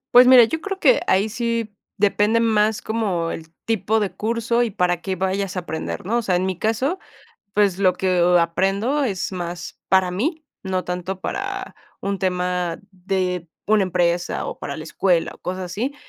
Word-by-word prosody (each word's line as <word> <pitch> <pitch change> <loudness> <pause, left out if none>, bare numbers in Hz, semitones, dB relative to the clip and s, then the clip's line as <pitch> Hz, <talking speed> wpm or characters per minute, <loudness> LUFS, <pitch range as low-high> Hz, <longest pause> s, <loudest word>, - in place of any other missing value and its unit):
Pues 250 +1 +9
mira, 250 -2 +9
yo 320 +8 -3
creo 390 +1 -4
que - - +5
ahí 195 +3 +3
sí 230 -1 -2 0.2
depende 210 +2 +3
más 220 -1 +2
como 195 -7 -1
el 160 0 -8
tipo 220 0 +1
de 205 -3 -2
curso, 230 +2 0
y 235 - -2
para 175 -2 0
qué 190 +1 -3
vayas 190 +1 -1
a - - +2
aprender, 160 0 -5
¿no? 230 +5 +1
O - - -1
sea, 185 -5 +1
en 185 - 0
mi 190 -2 -2
caso, 255 - 0 0.6
pues, 200 -3 +3
lo 190 -2 +4
que, 180 -1 +1
o 180 +1 +5
aprendo 195 - +1
es 195 -8 -2
más 175 -2 -6
para 190 -1 +3
mí, 310 - -2 0.2
no 185 -1 -1
tanto 180 +1 -4
para 395 - -4 0.2
un 200 0 -2
tema 180 -2 -1
de 180 -2 -2 0.2
una 210 -2 +4
empresa, 175 -1 0
o, - - -6
para - - -5
la 155 - -6
escuela, 170 +2 +1
o, - - -17
cosas 185 +1 -4
así. 225 +11 -3
195 Hz, 185 wpm, -22 LUFS, 180-225 Hz, 0.6 s, Pues